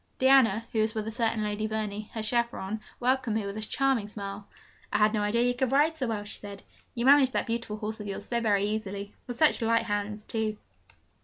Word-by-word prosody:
Diana, 255 -5 +5
who 225 - 0
was 220 +1 0
with 215 -1 -2
a - - -2
certain 225 -1 0
Lady 210 +1 -2
Verney, 215 -1 -4
her 220 - -2
chaperon, 220 -2 -1 0.2
welcomed 255 -2 +1
me 215 - -2
with 200 0 -5
a 215 - -4
charming 260 -1 0
smile. 200 -1 -7 0.4
'I - - +2
had 215 +1 +4
no 215 - +1
idea 215 +3 +2
you 245 0 +2
could 255 0 -1
ride 295 +4 +4
so 280 -6 -2
well,' 215 -2 -2
she 210 - -6
said, 200 -1 -9 0.3
'you 235 0 -1
manage 275 -1 +7
that - - 0
beautiful 230 -2 -3
horse 215 +1 -4
of 210 - -6
yours 200 +1 -5
so 235 +1 -1
very 205 -3 +2
easily 205 -1 -3
with 245 -1 -5
such 305 -2 +4
light 230 0 +2
hands, 210 -1 -3
too.' 220 -1 -2
220 Hz, 225 wpm, -28 LUFS, 210-235 Hz, 0.4 s, manage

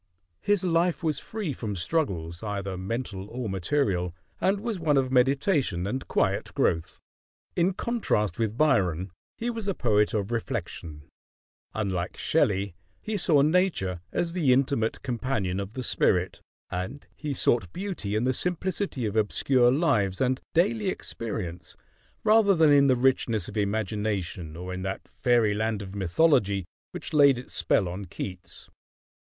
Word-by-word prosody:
His 205 -2 +2
life 175 0 +1
was 155 -2 0
free 210 -9 -4
from 105 -5 -4
struggles, 85 - -2
either 100 -3 -3
mental 100 0 -4
or 120 -1 -4
material, 95 - 0 0.2
and 195 +1 +2
was 220 -2 -3
one 150 -3 +2
of 130 -1 +1
meditation 130 - +2
and 130 +6 -3
quiet - - 0
growth. 80 -1 0 0.6
In 180 +2 +2
contrast 200 - 0
with 110 0 -1
Byron, 95 - +2 0.3
he 240 +1 -2
was 225 -3 -5
a 195 - 0
poet 105 -3 +2
of 105 +1 -1
reflection; 80 -9 -4 0.7
unlike 95 -4 -2
Shelley, 100 - +1 0.3
he 215 - -4
saw 160 -7 +4
Nature 150 - +1
as 170 -1 -1
the 160 -8 +2
intimate 130 -3 +1
companion 120 -7 -1
of 100 +2 -5
the 130 - -4
spirit; - - +1 0.3
and 95 +11 -4
he 150 -3 -4
sought 110 -8 +2
beauty 180 - -4
in 110 - +1
the 130 +1 +2
simplicity 180 - -1
of 105 0 -2
obscure 120 +3 +3
lives 105 - +1
and 130 0 +1
daily 205 +5 +2
experience 105 - -5 0.5
rather 215 -2 +5
than 160 -3 +5
in 140 -1 +6
the 130 - +4
richness 120 -5 +1
of 105 - -9
imagination 100 -5 -2
or 90 +1 -5
in 90 - -4
that 95 +1 -4
fairy 120 -4 +2
land 110 0 -1
of 95 0 -9
mythology 100 - +2 0.2
which - - -7
laid 140 -3 +6
its 125 - -9
spell 95 - +2
on 95 +3 -5
Keats. 90 0 -8
115 Hz, 150 wpm, -27 LUFS, 95-155 Hz, 0.7 s, in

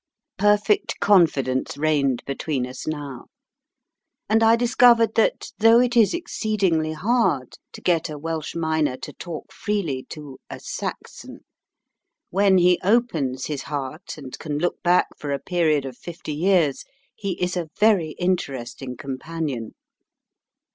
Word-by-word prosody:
Perfect 205 +1 +2
confidence 140 -10 +2
reigned 145 -4 +1
between 140 -1 -2
us 125 0 -8
now, 145 -5 -5 1.0
and 220 +2 +3
I 225 0 +6
discovered 235 -1 +4
that, 225 - +1
though 225 +2 +7
it 245 0 +2
is 230 - +4
exceedingly 200 - 0
hard 170 - 0
to - - -10
get 170 -2 +1
a 150 - -6
Welsh 160 0 -4
miner 160 -5 0
to - - -8
talk 170 -3 -8
freely 175 -12 -2
to 145 -4 -9
"a - - -7
Saxon," - - -7 0.9
when 195 0 +4
he 180 0 +4
opens 170 - +1
his 145 -3 -3
heart, 145 +5 -5
and 135 -4 -8
can 150 -2 -3
look 175 +4 -1
back 180 +1 +4
for 145 - -5
a 140 - 0
period 155 -3 +1
of 130 -2 -7
fifty 165 -3 -7
years, 165 -3 +2 0.3
he 200 -3 -3
is 180 0 -1
a 170 -3 -3
very 195 -8 +3
interesting 135 -8 -3
companion. 135 -3 -5
165 Hz, 135 wpm, -23 LUFS, 140-200 Hz, 1.0 s, though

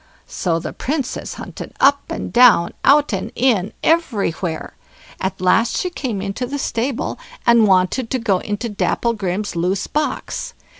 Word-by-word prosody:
So 170 -3 -1
the 165 - -5
Princess 275 -1 -3
hunted - - -9
up 280 +1 +3
and - - -5
down, 240 -8 +6
out 290 -3 +4
and 190 - -3
in, 220 -6 +2
everywhere; 200 - 0 0.5
at 190 0 -3
last 185 +6 +2
she 360 - -1
came 235 - -3
into 200 +6 -3
the 285 +3 -3
stable, 250 - -2 0.3
and 235 -2 +5
wanted 190 +6 +2
to 260 - 0
go 210 -6 +1
into 210 +4 -3
Dapplegrim's 210 -2 -1
loose 180 +3 0
box. 305 +10 -3
225 Hz, 145 wpm, -20 LUFS, 190-260 Hz, 0.5 s, down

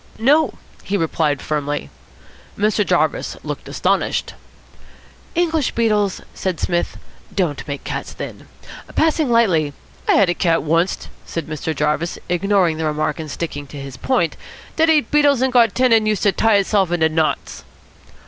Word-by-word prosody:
"No," 275 +2 +3 0.3
he 200 +2 -1
replied 160 -4 0
firmly. 145 -1 -2 0.7
Mr. 210 +1 +2
Jarvis - - 0
looked - - -6
astonished. - - 0 1.0
"English 325 -4 +1
beetles," 210 -4 +1
said 185 -4 -3
Psmith, 175 -1 -1 0.3
"don't 170 -8 -2
make 140 -1 -5
cats - - -4
thin. - - -8 0.5
Passing 315 -3 +2
lightly 180 -11 +3 0.2
" - - -27
"I - - +6
had 200 - +5
a 175 - +2
cat 170 -2 +1
oncest," 165 +4 0 0.2
said 165 - -4
Mr. 155 0 -4
Jarvis, 150 +4 0
ignoring 180 -2 +2
the 160 - -2
remark 155 +2 -1
and 155 -1 -5
sticking 145 -2 -5
to 145 - -10
his 135 -2 -7
point, 170 - 0 0.4
"dat 320 0 +3
ate 305 -2 +3
beetles 285 -3 +4
and 260 -1 +1
got 235 -4 +5
thin 255 -2 +3
and 220 -1 +4
used 215 -2 0
to 205 - +4
tie 220 +3 +3
itself 195 -2 +2
into 165 -2 +3
knots." 160 0 -1
185 Hz, 160 wpm, -20 LUFS, 155-230 Hz, 1.0 s, I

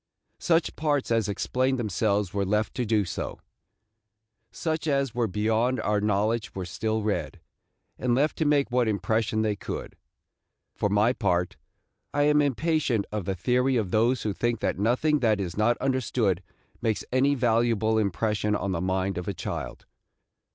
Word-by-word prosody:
Such 165 -2 +1
parts 145 -5 0
as 115 -3 +2
explained 130 +6 0
themselves 105 -3 0
were 100 0 0
left 105 +3 0
to 125 -3 -2
do 105 -2 +2
so. 85 - -5 1.1
Such 160 -1 -2
as 140 -4 +1
were 120 -2 0
beyond 110 +5 +1
our 105 -1 0
knowledge 105 +2 0
were 95 -1 -4
still 110 +4 -2
read, 105 -1 -2 0.6
and 125 -1 +1
left 145 +4 +1
to 160 - +2
make 145 -3 +2
what 125 -1 +2
impression 110 +2 0
they 105 -1 0
could. - - -6 0.8
For 105 - -1
my 105 +4 +3
part, 90 -7 0 0.6
I 145 - +3
am 150 0 +4
impatient 145 -5 +1
of 105 -4 -3
the 95 - -1
theory 125 +7 +1
of 105 -6 0
those 115 +3 +2
who 105 - -1
think 120 +2 -1
that - - -1
nothing 130 +8 +2
that 110 -5 +2
is 90 -3 -3
not 115 +3 +2
understood 125 -8 0 0.4
makes 110 -3 -1
any 135 +3 +3
valuable 115 -3 +2
impression 105 +1 0
on 100 -1 -2
the 85 -2 -2
mind 95 0 -1
of 90 - -7
a 100 - -2
child. - - -5
110 Hz, 165 wpm, -26 LUFS, 100-130 Hz, 1.1 s, am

